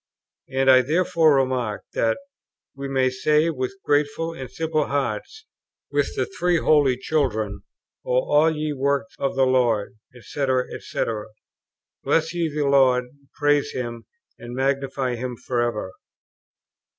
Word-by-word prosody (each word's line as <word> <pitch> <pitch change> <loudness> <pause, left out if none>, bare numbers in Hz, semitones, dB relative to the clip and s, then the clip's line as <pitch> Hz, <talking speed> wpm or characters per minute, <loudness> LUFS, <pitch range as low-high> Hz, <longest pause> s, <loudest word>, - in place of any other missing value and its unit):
and 135 0 0
I 130 -1 +8
therefore 160 +1 +3
remark 130 -5 0
that 115 - +1 0.6
"we 140 0 -5
may 130 -1 +1
say 150 +5 +2
with 130 +3 -4
grateful 150 +3 +1
and 130 -6 -7
simple 155 -1 -1
hearts 140 - -3 0.5
with - - 0
the - - 0
Three 180 - 0
Holy 145 -5 +3
Children, 110 -9 -1 0.4
'O - - -2 0.2
all 150 +2 +6
ye 155 -1 -2
works 140 0 -1
of 135 - -1
the 135 0 +4
Lord, 120 -4 +1 0.2
&c., 140 +5 -3 0.3
&c., - - -3 1.0
bless 165 +1 +1
ye 170 -3 -1
the 150 0 -1
Lord, 130 -2 +4 0.4
praise 145 0 +2
Him, 120 -2 -5 0.3
and 120 +1 -8
magnify 135 -1 -1
Him 125 +1 -4
for 125 0 -2
ever.'" 110 -5 -2
135 Hz, 135 wpm, -23 LUFS, 125-150 Hz, 1.0 s, I